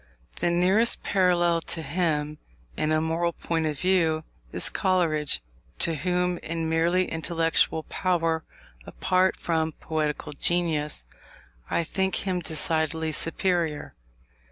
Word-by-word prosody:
The -, -, +1 dB
nearest 185 Hz, +7 st, +2 dB
parallel 175 Hz, -3 st, +2 dB
to 165 Hz, 0 st, -3 dB
him, 150 Hz, -1 st, -1 dB, 0.4 s
in 155 Hz, -, 0 dB
a 155 Hz, -, +3 dB
moral 165 Hz, +2 st, 0 dB
point 165 Hz, -1 st, -1 dB
of 150 Hz, -2 st, -3 dB
view, 165 Hz, -4 st, +2 dB, 0.3 s
is -, -, -1 dB
Coleridge, 160 Hz, -, +1 dB, 0.3 s
to 165 Hz, -, +2 dB
whom, 180 Hz, +2 st, 0 dB
in 165 Hz, 0 st, -3 dB
merely 170 Hz, +3 st, +2 dB
intellectual 165 Hz, -1 st, +1 dB
power, 165 Hz, -3 st, 0 dB, 0.4 s
apart 185 Hz, 0 st, +1 dB
from 160 Hz, -1 st, -1 dB
poetical 150 Hz, -1 st, -3 dB
genius, 155 Hz, -, 0 dB, 0.6 s
I 170 Hz, -, +1 dB
think 190 Hz, +3 st, -1 dB
him 185 Hz, -1 st, 0 dB
decidedly 160 Hz, -1 st, 0 dB
superior. 165 Hz, -1 st, -1 dB
165 Hz, 115 wpm, -26 LUFS, 160-180 Hz, 0.6 s, a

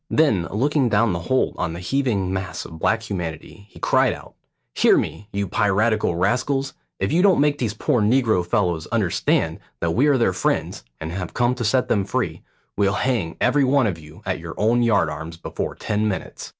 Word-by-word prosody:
Then 110 Hz, -, +2 dB
looking 135 Hz, +4 st, +1 dB
down 105 Hz, -1 st, +2 dB
the 85 Hz, -, -2 dB
hold 130 Hz, -, +2 dB
on 80 Hz, -, -1 dB
the 85 Hz, -, -6 dB
heaving 100 Hz, -3 st, 0 dB
mass 95 Hz, -1 st, -4 dB
of 80 Hz, -, -10 dB
black 110 Hz, +6 st, +1 dB
humanity, 90 Hz, +2 st, -6 dB
he -, -, -17 dB
cried -, -, +3 dB
out, -, -, -12 dB, 0.4 s
"Hear -, -, +4 dB
me, 105 Hz, -, -3 dB
you 100 Hz, 0 st, -2 dB
piratical 105 Hz, 0 st, +1 dB
rascals; 130 Hz, +9 st, 0 dB, 0.3 s
if -, -, -1 dB
you 170 Hz, +3 st, +3 dB
don't 195 Hz, -1 st, +4 dB
make 145 Hz, 0 st, +2 dB
those 110 Hz, -4 st, -2 dB
poor 115 Hz, +2 st, +1 dB
negro 110 Hz, -4 st, +3 dB
fellows 85 Hz, -3 st, 0 dB
understand 105 Hz, -8 st, 0 dB, 0.2 s
that 85 Hz, -, 0 dB
we 130 Hz, -, +3 dB
are 145 Hz, -2 st, +4 dB
their 115 Hz, -6 st, +2 dB
friends, -, -, -1 dB, 0.2 s
and 80 Hz, +1 st, -5 dB
have 90 Hz, -1 st, -5 dB
come 120 Hz, +1 st, +2 dB
to 125 Hz, -2 st, -4 dB
set 125 Hz, +4 st, +2 dB
them 100 Hz, -3 st, +1 dB
free, -, -, -2 dB, 0.3 s
we'll 100 Hz, -1 st, +2 dB
hang 105 Hz, -9 st, -1 dB
every 140 Hz, +3 st, +3 dB
one 135 Hz, 0 st, +3 dB
of 90 Hz, -6 st, -2 dB
you 75 Hz, +1 st, -14 dB
at 95 Hz, -1 st, -2 dB
your 80 Hz, 0 st, -8 dB
own 115 Hz, +3 st, +2 dB
yard 105 Hz, -8 st, +3 dB
arms 80 Hz, +2 st, -6 dB
before 85 Hz, -, -5 dB
ten 105 Hz, 0 st, -1 dB
minutes." 95 Hz, -3 st, -5 dB
105 Hz, 200 wpm, -22 LUFS, 90-125 Hz, 0.4 s, Hear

